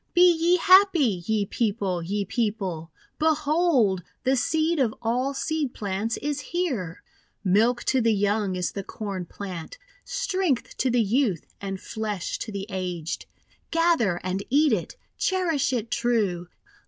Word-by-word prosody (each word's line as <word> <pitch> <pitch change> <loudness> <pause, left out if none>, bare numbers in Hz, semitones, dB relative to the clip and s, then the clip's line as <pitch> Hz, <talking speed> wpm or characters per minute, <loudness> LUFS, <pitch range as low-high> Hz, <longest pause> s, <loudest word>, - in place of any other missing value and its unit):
Be 350 - +7
ye 340 +2 +3
happy, 345 - +5
ye 215 -2 +1
People! 200 -5 -1
ye 200 +4 -2
People! 195 -7 -2 0.3
Behold 305 - +2 0.2
the 260 +1 +3
seed 315 +5 +1
of 235 -5 +1
all 250 +4 -1
seed 300 -2 -2
plants 205 +3 -2
is 290 0 -2
here 270 - -3
I - - -37 0.3
Milk 220 +6 +3
to 260 -1 +2
the 230 0 +3
young 205 -1 +1
is 180 -3 -1
the 200 - -4
Corn 195 -4 -5
Plant; 185 - -7 0.3
Strength 375 - -1
to 260 - +1
the 240 -1 +3
youth, 215 - 0
and 195 -1 -4
flesh 210 -4 -4
to 220 - -5
the 200 -1 -4
aged! 180 -3 -4 0.4
Gather 330 - +2
and 185 +2 -2
eat 290 0 +4
it. 185 - -2 0.2
Cherish 335 -8 +1
it 235 -2 -2
true. 205 -8 0
225 Hz, 145 wpm, -25 LUFS, 195-290 Hz, 0.4 s, Be